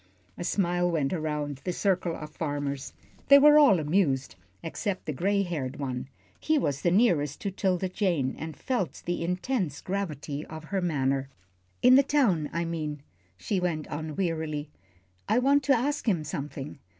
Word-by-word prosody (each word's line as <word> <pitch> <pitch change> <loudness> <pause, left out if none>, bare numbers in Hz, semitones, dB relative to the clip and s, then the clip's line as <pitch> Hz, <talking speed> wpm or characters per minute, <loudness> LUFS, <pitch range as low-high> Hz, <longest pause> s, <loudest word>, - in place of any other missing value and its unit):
A - - -6
smile 175 -1 +1
went 155 -4 0
around 150 -4 -3
the 180 - -1
circle 180 -2 0
of 150 0 -8
farmers. 145 -3 -3 0.3
They 280 - +9
were 295 +1 +8
all 260 - +6
amused, 150 - +1 0.3
except 190 +4 -3
the 155 - -2
gray 200 +7 +1
haired 150 -7 -4
one. 130 -3 -4 0.3
He 310 0 +2
was 140 - -1
nearest 170 - +2
to 200 - -2
'Tilda 190 -1 0
Jane, 175 -9 0
and 160 -3 -6
felt 245 - -2
the 175 -1 -2
intense 180 - -1
gravity 155 -7 -4
of 160 0 -8
her 190 +4 -2
manner. 135 -5 0 0.5
"In 250 +1 +8
the 270 - +8
town, 235 - +2
I 170 +1 -1
mean," 155 -3 -4 0.3
she 195 - -1
went 170 -4 -2
on, 155 0 -5
wearily. 160 -5 -2 0.6
"I 220 - +3
want 275 +3 +4
to 275 -3 +4
ask 285 0 0
him 170 -6 +1
something. 145 -1 -6
170 Hz, 160 wpm, -28 LUFS, 150-195 Hz, 0.6 s, They